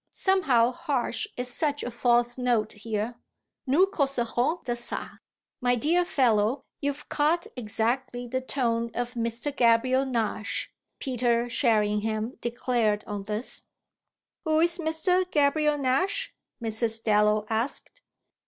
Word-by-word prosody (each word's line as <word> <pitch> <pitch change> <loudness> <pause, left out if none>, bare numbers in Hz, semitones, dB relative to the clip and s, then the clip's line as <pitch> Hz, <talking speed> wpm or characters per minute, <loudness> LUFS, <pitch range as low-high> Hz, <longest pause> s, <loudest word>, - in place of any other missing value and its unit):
Somehow 270 - +3
Harsh 265 -1 -2
is 250 0 -2
such 290 0 0
a 245 - -4
false 240 0 +2
note 240 -4 0
here. 220 +2 -4 0.5
Nous 300 +9 +5
causerons 275 - -1
de 245 - -2
ça." 240 0 -4 0.4
"My 245 0 +3
dear 325 +9 +2
fellow, 250 -5 +2 0.2
you've 285 +1 -3
caught 315 +4 +1
exactly 245 +2 -2
the 260 +2 -2
tone 235 -3 -1
of 245 0 -2
Mr. 235 +4 -1
Gabriel 255 +3 +3
Nash," 225 -3 -2 0.3
Peter 240 -3 0
Sherringham 215 -1 +1
declared 235 -3 0
on 205 -1 -5
this. 215 +4 -1 0.8
"Who's 325 +2 +2
Mr. 335 +3 +2
Gabriel 300 0 +2
Nash?" 275 +8 0 0.3
Mrs. 225 0 +2
Dallow 210 0 +3
asked. 235 - -3
245 Hz, 115 wpm, -27 LUFS, 230-285 Hz, 0.8 s, Nous